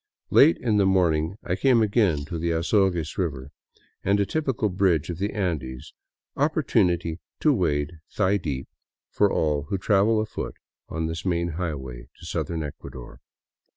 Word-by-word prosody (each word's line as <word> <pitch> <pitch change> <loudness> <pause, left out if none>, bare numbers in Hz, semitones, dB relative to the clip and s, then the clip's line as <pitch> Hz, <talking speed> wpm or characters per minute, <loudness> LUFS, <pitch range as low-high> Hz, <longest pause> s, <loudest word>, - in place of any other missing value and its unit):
Late 85 - +6
in 110 -4 +1
the 100 -2 +4
morning 85 -1 +2
I 90 - -1
came 125 0 +4
again 100 -9 +2
to 80 +3 -5
the 85 +1 -1
Azogues 85 -1 +1
river, 70 -6 -3 0.5
and 100 +1 +2
a 100 - +3
typical 135 -6 -1
bridge 90 -4 +1
of 85 - -7
the 100 +2 -1
Andes, 80 -11 -3 0.2
— - - -63
opportunity 90 - +1 0.2
to 150 - +4
wade 80 - -1
thigh 100 0 +1
deep 70 -7 -4 0.4
for - - +3
all 75 -2 0
who 100 - 0
travel 105 +3 +3
afoot 110 0 -4 0.3
on 80 0 -2
this 80 0 -4
main 85 -2 0
highway 70 -8 -5
to - - -13
southern 80 -2 -2
Ecuador. 65 -4 -9
85 Hz, 155 wpm, -25 LUFS, 75-100 Hz, 0.5 s, Late